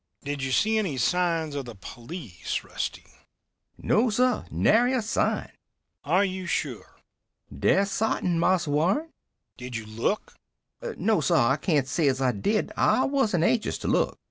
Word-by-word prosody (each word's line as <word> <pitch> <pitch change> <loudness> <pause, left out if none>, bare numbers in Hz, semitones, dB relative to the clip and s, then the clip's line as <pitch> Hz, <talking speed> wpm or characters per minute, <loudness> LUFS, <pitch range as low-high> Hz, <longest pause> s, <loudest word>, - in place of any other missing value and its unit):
"Did 145 0 -4
you 135 0 -2
see 220 +10 +2
any 180 -11 -2
signs 165 +2 +1
of 140 -2 -4
the 120 -2 -9
police, 120 - -6
Rusty?" - - -5 0.7
"No, 230 +3 +2
sir. 250 +3 +1
Nary 245 +4 +3
a 255 - +1
sign." 215 - -1 0.5
"Are 195 +2 +3
you 185 -1 -4
sure?" 135 -8 -3 0.6
"Dead 195 - +3
sartin, 190 -5 0
Marse 180 -1 +2
Warren." 180 - +1 0.5
"Did 125 -1 -7
you 110 -1 -4
look?" 115 - -2 0.6
"No, 215 -5 +2
sir. 135 - +2
I 130 +2 +4
cain't 150 -7 +1
say 150 +3 +1
as 135 -1 +1
I 130 -2 +2
did. 205 - -1
I 215 +4 +3
wasn't 225 - +1
anxious 220 +5 +1
to - - -6
look." - - +1
170 Hz, 155 wpm, -26 LUFS, 135-215 Hz, 0.7 s, I